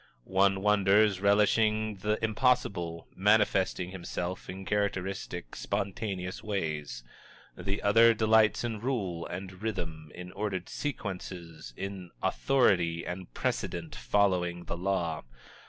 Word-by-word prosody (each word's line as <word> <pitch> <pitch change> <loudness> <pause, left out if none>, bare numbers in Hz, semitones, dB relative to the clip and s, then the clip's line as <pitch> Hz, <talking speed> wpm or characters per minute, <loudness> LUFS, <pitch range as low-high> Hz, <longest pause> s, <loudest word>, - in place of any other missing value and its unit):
One 95 0 +3
wonders, 105 -1 +4
relishing 105 +1 +3
the 105 +3 0
impossible, 100 -8 0
manifesting 95 -3 +2
himself 90 0 -5
in 95 +1 -6
characteristic, 95 -7 -2
spontaneous 95 -2 -3
ways; 75 - -3 0.5
the 95 +3 -3
other 115 +3 +6
delights 110 0 +4
in 115 -3 -2
rule 100 -9 -2
and 95 +1 -7
rhythm, 80 -8 -4
in 90 0 -8
ordered 95 -3 -3
sequences, 90 - -5
in 95 -2 -5
authority 90 -11 +2
and 90 -4 -6
precedent, 85 -2 -2
following 90 +4 +1
the - - -4
law. 85 -3 -1
95 Hz, 105 wpm, -30 LUFS, 90-105 Hz, 0.5 s, other